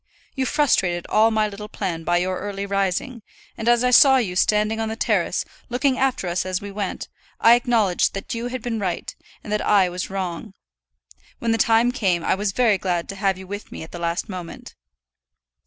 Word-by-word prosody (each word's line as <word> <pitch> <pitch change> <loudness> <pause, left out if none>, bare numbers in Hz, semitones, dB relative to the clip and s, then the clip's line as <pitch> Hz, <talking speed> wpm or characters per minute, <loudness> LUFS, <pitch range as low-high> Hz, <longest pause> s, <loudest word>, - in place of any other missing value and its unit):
You 265 -2 -1
frustrated 190 - +1
all 220 +1 +4
my 215 -1 +1
little 210 +1 -8
plan 170 -5 -4
by 175 +1 +1
your 185 +1 -1
early 200 0 -4
rising; 200 +5 -1 0.3
and 225 - -5
as 240 0 +4
I 250 - +2
saw 265 +2 +7
you 200 -8 -1
standing 210 +3 +2
on 220 0 -1
the 220 - -3
terrace, - - 0 0.2
looking 255 +2 +1
after 260 -8 0
us 175 +1 -1
as 185 -1 -2
we 200 0 -8
went, 200 -1 -4 0.3
I 230 - +7
acknowledged 235 -8 +2
that 195 - -5
you 235 +1 -3
had 250 -1 -5
been 235 -3 -2
right, 185 -4 -3 0.3
and 210 - -5
that 210 - 0
I 195 -3 +3
was 180 +1 -5
wrong. 190 +1 -5 0.8
When 230 - -1
the 225 - +1
time 230 +2 +4
came, 185 -8 0
I - - +2
was 200 +1 -1
very 220 -2 +2
glad 175 -2 -1
to 200 - -5
have 195 -1 0
you 190 - -10
with 205 +2 -7
me - - -7
at 160 - -12
the 175 - -7
last 170 +3 -2
moment. 180 -5 -8
205 Hz, 205 wpm, -22 LUFS, 185-230 Hz, 0.8 s, saw